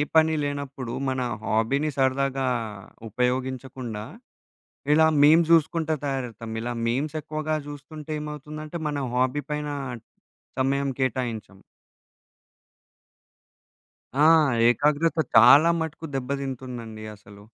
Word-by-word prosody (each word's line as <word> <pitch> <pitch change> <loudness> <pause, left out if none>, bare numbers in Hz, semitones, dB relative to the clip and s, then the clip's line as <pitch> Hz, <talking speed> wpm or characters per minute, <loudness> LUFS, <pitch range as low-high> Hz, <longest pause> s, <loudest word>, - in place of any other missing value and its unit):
పని 160 0 +5
లేనప్పుడు 140 -4 -4
మన 130 -1 -1 0.2
హాబీని 125 +8 +1
సరదాగా 135 0 +1 0.6
ఉపయోగించకుండా, 125 -1 -3 0.9
ఇలా 160 +1 +5
మీమ్స్ 160 +3 +6
జుసుకుంటా 160 0 +2
తయారవుతాం. 120 -5 -4
ఇలా 120 +1 -3
మీమ్స్ 145 +6 -1
ఎక్కువగా 155 +1 -3
చూస్తుంటే 150 +1 -8
ఏమవుతుందంటే 150 +2 -7
మన 145 -2 -2
హాబీ 130 +3 +1
పైన 150 0 -2 0.9
సమయం 140 +1 +1
కేటాయించాం. 120 -6 -2 2.6
ఆ! 150 - +6 0.5
ఏకాగ్రత 150 +6 +2 0.2
చాలా 155 +4 +8
మటుకు 160 0 -4
దెబ్బదింటుందండి 125 -4 -5
అసలు. 100 0 -16
140 Hz, 90 wpm, -25 LUFS, 125-150 Hz, 2.6 s, చాలా